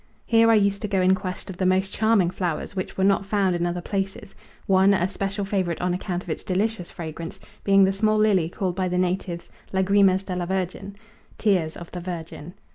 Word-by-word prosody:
Here 230 -1 +4
I 225 - +6
used 200 -1 +2
to 210 - -2
go 195 -2 0
in 185 +1 +4
quest 185 -1 -4
of 180 - -10
the 185 - 0
most 190 +1 +1
charming 220 -5 +3
flowers 180 +1 -3
which 185 - -4
were 190 - +1
not 195 0 +3
found 195 -2 +1
in 175 0 0
other 175 0 -3
places; 195 +1 -4 0.3
one, 195 +1 +4
a 180 -1 +1
special 195 +1 -3
favourite 190 -4 -1
on 180 0 0
account 180 0 -3
of - - -12
its - - -4
delicious 195 0 -1
fragrance, 165 0 -7 0.2
being 195 0 +5
the 190 0 +3
small 215 +2 +2
lily 200 -6 +3
called 180 0 -3
by 185 -1 0
the 180 0 -1
natives 180 -1 -2 0.2
Lagrimas 190 0 +3
de 185 -1 -4
la 175 -1 -2
Virgin 190 +1 -3 0.4
Tears 180 -7 +1
of 170 - -10
the 180 - -6
Virgin. 170 -1 -7
190 Hz, 210 wpm, -24 LUFS, 180-200 Hz, 0.4 s, I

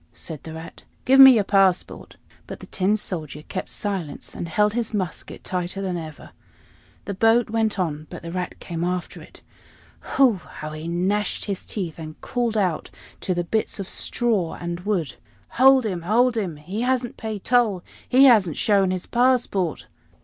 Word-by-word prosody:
said 160 -4 -7
the 160 - -9
Rat. 160 +1 -10 0.2
"Give 270 +1 +5
me 265 -1 +11
your 215 - +3
passport." 195 -2 +1 0.3
But - - -8
the - - -10
Tin 200 +3 0
Soldier 155 -7 -5
kept 185 - -5
silence, 190 -7 -4
and 170 - -6
held 210 +5 +2
his 230 -2 -2
musket 185 -5 -5
tighter 180 +1 -3
than 190 -2 -2
ever. 155 -3 -8 0.7
The 200 - -3
boat 225 +3 +3
went 220 -2 0
on, 155 -4 -2
but 175 -2 -9
the 170 - -6
Rat 180 0 -4
came 170 -1 -5
after 180 0 -3
it. - - -15 0.8
Hu! 255 -7 +5
how 155 0 -8
he 155 +1 -7
gnashed 190 +5 0
his 200 -3 -4
teeth, 175 -6 -4
and 155 -1 -9
called 240 -3 -2
out 180 -6 0 0.3
to 185 - -2
the 175 - 0
bits 215 +4 -2
of 195 - -4
straw 215 -9 -1
and 175 0 -4
wood. 180 -6 -2 0.3
"Hold 265 0 +5
him! 185 -5 -2
hold 230 +7 +2
him! 190 -8 -2
He 180 +9 -5
hasn't 250 -1 0
paid 215 -3 -6
toll 225 -7 +2 0.3
he 260 +2 +6
hasn't 205 - +5
shown 200 -3 +3
his 185 -1 -3
passport!" 240 - +1
195 Hz, 175 wpm, -23 LUFS, 170-225 Hz, 0.8 s, me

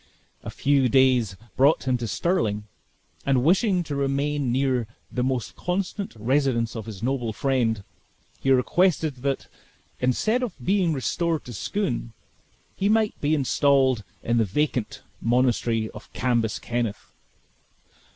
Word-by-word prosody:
A - - -7
few 135 -2 +2
days 125 -5 +3 0.2
brought 140 +4 +4
him 130 - +3
to 120 - -3
Stirling; 110 - 0 0.6
and 135 -3 +2
wishing 185 - +3
to 150 -3 -4
remain 140 -1 0
near 130 -2 +1 0.2
the 125 - -1
most 130 -3 -2
constant 190 - -3
residence 120 0 +1
of 110 -1 -6
his 105 -1 -8
noble 120 -3 -1
friend, 115 -4 0 0.6
he 135 - -1
requested 155 +3 +2
that, 135 +1 -2 0.5
instead 215 - +1
of 240 -8 -3
being 185 +5 +1
restored 160 +4 -1
to 120 - -8
Scone, - - -2 0.6
he 200 - 0
might 220 -1 +3
be 150 +2 +2
installed 135 -4 +2 0.2
in 120 0 +1
the - - +4
vacant 125 +3 -1 0.2
monastery 120 -2 +1
of - - -12
Cambus 120 -3 0
Kenneth. 120 -3 -3
130 Hz, 130 wpm, -25 LUFS, 120-150 Hz, 0.6 s, brought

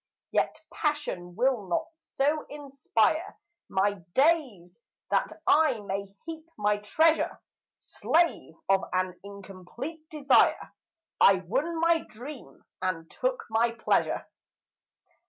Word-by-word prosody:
Yet - - 0
passion 295 - -2
will 245 -3 +1
not 180 - 0
so 300 -1 -1
inspire 290 - -1 0.3
My 200 +1 +1 0.2
days 260 - +1 0.3
that - - +1
I 300 -6 +4
may 200 0 -4 0.2
heap 325 0 -8
my 210 0 +2
treasure; 315 +10 +2 0.4
Slave 335 - 0
of 195 0 +4
an 185 -1 -1
incomplete 200 - -9
desire, 285 -3 +3 0.5
I 195 -1 +6
won 295 - -1
my 335 0 +4
dream 260 +2 -11 0.2
and 165 -3 -3
took - - -1
my 230 +1 +2
pleasure. 230 - 0
255 Hz, 105 wpm, -28 LUFS, 195-315 Hz, 0.5 s, I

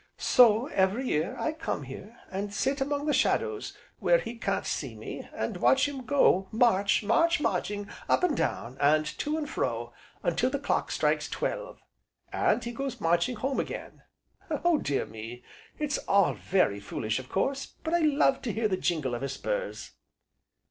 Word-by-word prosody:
So, 235 -1 +5
every 200 +2 +1
year, 155 -8 0
I 315 - 0
come 315 - -4
here, 190 - -10
and 200 +2 -3
sit 270 +6 -1
among 285 +1 -1
the 300 - +1
shadows, 435 -2 0 0.2
where - - +4
he 240 - -5
can't 230 - -2
see - - -3
me, - - -8
and - - -3
watch 270 +1 +4
him 270 -4 -7
go 195 -9 +4
march, 215 -4 +3
march, 330 - +3
marching 205 -7 -1 0.2
up - - +3
and 340 -5 +3
down, 120 +3 -2
and 155 +2 +4
to 305 +1 -1
and 305 -2 -3
fro, 120 - -2 0.3
until 200 +9 +1
the 280 - -1
clock 280 - -1
strikes - - +1
twelve, - - -4 0.5
and - - +2
he 235 - -4
goes 255 0 -4
marching 170 +8 +2
home 265 +5 -1
again. - - -5 0.5
Oh 320 +1 +2
dear 140 - -1
me! 115 +3 -9 0.3
it's 295 -1 -1
all 200 -2 +4
very 180 - +1
foolish, 110 +3 -2
of 130 - -10
course, 270 +8 -1 0.2
but 320 - -2
I 345 - +4
love 290 -3 +3
to 235 - -2
hear 220 +1 0
the 190 -3 0
jingle 155 -9 -1
of 120 - -3
his 135 0 -3
spurs." - - -4
230 Hz, 175 wpm, -28 LUFS, 175-285 Hz, 0.5 s, So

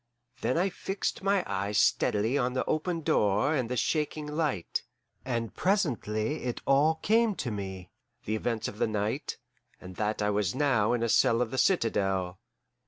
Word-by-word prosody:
Then - - +1
I 185 +3 +2
fixed 195 +2 -3
my 195 -1 +2
eyes 100 +2 -2
steadily 105 +5 +2
on 125 -2 +1
the 130 - -1
open 165 +2 -1
door 105 0 +2
and 130 -6 -1
the 125 - -2
shaking 150 +3 -1
light, 150 - -1 0.4
and 115 -3 -3
presently 145 - 0
it 120 - -2
all 145 +4 +4
came 225 -1 +3
to 125 - -3
me: 95 -3 -6 0.3
the 110 - -1
events 115 0 -2
of 105 - -8
the - - +2
night, 110 +5 -2 0.4
and 90 0 -11
that 105 0 -1
I 105 - +2
was 100 0 0
now 125 -6 +2
in 120 -1 0
a - - +2
cell 115 +1 +4
of 120 -2 -1
the 130 - -1
citadel. 95 - +1
120 Hz, 170 wpm, -29 LUFS, 105-150 Hz, 0.4 s, all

